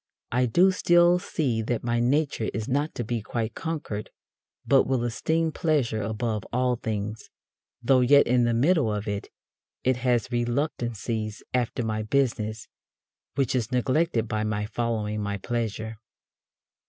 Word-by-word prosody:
I 125 +1 +2
do 180 +11 +5
still 175 -1 +4
see 130 -10 -1
that 115 +1 -2
my 120 0 0
nature 130 -1 +1
is 110 0 -3
not 145 +4 -1
to 120 - -2
be 115 0 -2
quite 110 +1 -3
conquered, 150 -10 -4 0.6
but 135 -1 +4
will 130 -2 +1
esteem 160 +7 0
pleasure 145 -10 0
above 110 +1 -2
all 125 0 +1
things, 110 -1 -4 0.5
though 130 +2 +5
yet 140 +3 +6
in 125 0 +3
the 120 - +2
middle 145 -1 +3
of 105 0 -3
it, 100 -1 -3 0.6
it 130 -1 +2
has 125 -2 0
reluctances 120 -4 -2
after 120 -1 0
my 110 -1 -1
business, 110 -2 -1 0.7
which 135 -3 +1
is 125 -2 -1
neglected 130 -1 +1
by 110 0 -1
my 105 -1 -1
following 110 -2 -2
my 100 0 -2
pleasure. 110 0 -3
120 Hz, 145 wpm, -26 LUFS, 110-135 Hz, 0.7 s, yet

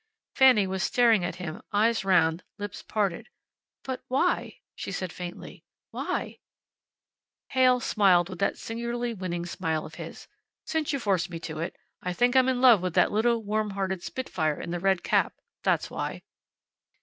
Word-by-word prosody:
Fanny 255 -7 +6
was 190 0 -3
staring 230 -6 +4
at - - -2
him 180 +3 -6
eyes 225 +1 +2
round, 175 -3 +3
lips 205 -1 -6
parted. 210 +1 -2 0.5
"But 260 -1 -5
why?" 260 +2 0
she - - -6
said, 185 -3 -4
faintly. 175 -1 -8 0.3
"Why?" - - -3 1.1
Heyl 255 -1 +4
smiled 185 -5 +3
that 200 - +1
singularly 235 +1 -3
winning 175 -4 -4
smile 160 -2 -2
of - - -10
his. - - -9 0.4
"Since 315 -2 -1
you 280 - 0
force 195 -8 0
me 170 -2 -6
to 155 -2 -6
it, 165 - -3 0.3
I 180 - -2
think 245 +6 +2
I'm 260 0 +5
in 250 -1 0
love 240 -7 +7
with 180 -2 -3
that - - +4
little, 230 +2 +2
warm 215 +1 -1
hearted 190 -2 -2
spitfire 160 - -2
in 170 - -5
the 175 - -2
red 190 0 +1
cap. - - +2 0.3
That's - - +1
why." - - -4
200 Hz, 160 wpm, -27 LUFS, 175-240 Hz, 1.1 s, love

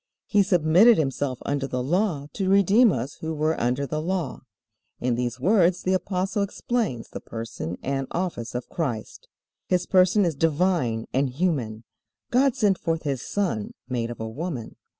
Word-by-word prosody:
He 205 - +3
submitted 185 +4 +5
Himself 135 -3 -1
under 140 -1 -1
the 125 -2 -2
Law 170 -1 0
to 190 -2 -1
redeem 200 +4 +5
us 130 -1 -4
who 160 0 -4
were 155 +1 0
under 125 +4 0
the 155 +2 -3
Law." 175 -4 -2 0.6
In 125 -1 0
these 125 +1 -2
words 180 - +3
the 185 - +1
Apostle 190 +2 -1
explains 200 - -2
the - - -6
person 115 -7 -6
and 135 0 -2
office 165 -11 -3
of 125 - -3
Christ. 125 -10 -4 0.4
His 180 -1 +1
person 185 +2 +4
is 170 - +1
divine 150 -6 +1
and 135 +1 +2
human. 125 -7 -1 0.5
"God 260 +1 +3
sent 205 -7 +2
forth 165 -1 -1
His 140 -4 -2
Son, 175 - -2
made 120 -2 -2
of 120 - -7
a 110 - -3
woman." 130 0 -5
160 Hz, 165 wpm, -25 LUFS, 125-185 Hz, 0.6 s, submitted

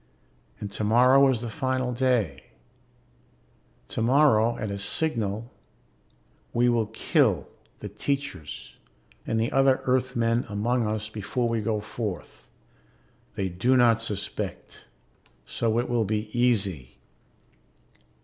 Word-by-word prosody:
And 105 -1 -6
tomorrow 125 +7 +4
is 125 -4 0
the 120 - -4
final 130 +1 -1
day. 120 - 0 1.4
Tomorrow, 120 -2 +3
at 110 - -4
a 100 - -4
signal, 110 -2 -1 1.0
we 120 +1 +3
will 115 -3 +1
kill 110 - +1 0.3
the - - -5
teachers 135 - -4 0.5
and 110 - 0
the 115 - 0
other 135 -1 +4
Earthmen 120 -2 +1
among 115 +3 0
us 105 0 -2
before 110 +3 -2
we 115 -1 -1
go 105 -1 -1
forth. 105 -5 -6 0.9
They 95 - -1
do 105 +9 +1
not 115 -2 +4
suspect, 100 -3 -5 0.6
so 115 -1 -1
it 120 - 0
will 120 -3 +1
be 105 +1 -3
easy. 100 - 0
115 Hz, 110 wpm, -26 LUFS, 105-125 Hz, 1.4 s, tomorrow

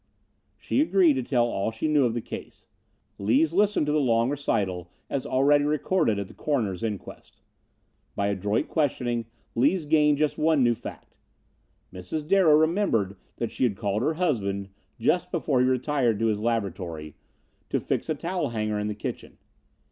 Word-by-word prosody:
She 270 - 0
agreed 190 - +4
to 130 - -1
tell 120 -1 +1
all 105 -3 -1
she 110 +7 -3
knew 150 -3 +3
of 115 -1 0
the 120 - -2
case. - - -9 0.5
Lees 130 +11 +2
listened 205 -3 +2
to 150 - 0
the 150 - +2
long 120 -2 +2
recital 95 - -1 0.2
as 135 -2 -2
already 145 +3 +3
recorded 150 - +1
at 100 -1 -3
the - - -14
coroner's 110 - -1
inquest. 105 -4 -6 0.8
By 100 0 0
adroit 100 +6 -1
questioning 120 -6 -1 0.3
Lees 150 +8 +2
gained 150 -1 +3
just 150 0 0
one 155 -3 +3
new 120 -1 +4
fact. - - -10 0.8
Mrs. 125 - -5
Darrow 180 -5 +5
remembered 160 - +1 0.2
that 115 - -3
she - - -2
had 110 -6 +1
called 105 -1 -1
her 155 +5 0
husband, 100 - -1 0.3
just 180 +9 +1
before 155 -6 0
he 125 - +3
retired 130 -3 +1
to 115 - 0
his 110 -2 +1
laboratory, 95 -9 -3 0.6
to - - 0
fix - - -2
a 155 - +1
towel 175 +2 -2
hanger 110 -2 -2
in 105 - -2
the 105 - -3
kitchen. 105 - -6
125 Hz, 170 wpm, -26 LUFS, 105-155 Hz, 0.8 s, Darrow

